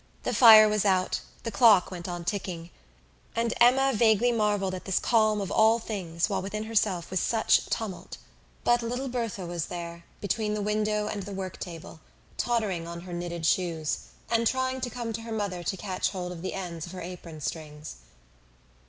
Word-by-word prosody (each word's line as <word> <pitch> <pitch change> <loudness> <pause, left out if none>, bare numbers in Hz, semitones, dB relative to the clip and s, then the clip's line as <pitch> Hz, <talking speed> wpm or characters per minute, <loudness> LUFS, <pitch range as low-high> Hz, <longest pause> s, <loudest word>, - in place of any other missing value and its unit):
The - - -1
fire 220 -3 +9
was 210 -1 +1
out, 185 -2 +1 0.2
the 230 - -3
clock 205 -4 +5
went 175 -1 -6
on 175 -1 -5
ticking, 175 -3 -4 0.6
and 230 0 0
Emma 265 +3 +5
vaguely 225 +1 +4
marvelled 205 -4 +1
at 185 - -6
this 190 - 0
calm 215 -2 +3
of 195 - -4
all 220 +1 +5
things 185 -7 -2
while 200 - -1
within 210 +3 -4
herself 205 -6 0
was 190 - +1
such 225 +4 +2
tumult. 210 -5 -4 0.5
But 240 0 +3
little 245 +3 -3
Berthe 235 -4 -3
was 170 -2 -3
there, 170 -1 -7
between 210 +1 -1
the 210 - -2
window 210 0 0
and 205 - -3
the 200 +1 -7
work 190 -1 -5
table, 165 -2 -8 0.4
tottering 210 -8 -1
on 170 0 -7
her 180 0 -9
knitted 175 -1 -4
shoes, 165 -3 0 0.3
and 230 0 +3
trying 260 +1 -1
to 250 - -2
come 235 -1 -5
to 225 - -4
her 230 0 -8
mother 200 -5 -2
to 190 +3 -3
catch 185 -1 -2
hold 180 -2 -5
of 170 -2 -8
the 185 - -4
ends 175 -4 -5
of 170 - -10
her 185 - -7
apron 170 -2 -8
strings. 150 - -6
200 Hz, 190 wpm, -27 LUFS, 175-225 Hz, 0.6 s, fire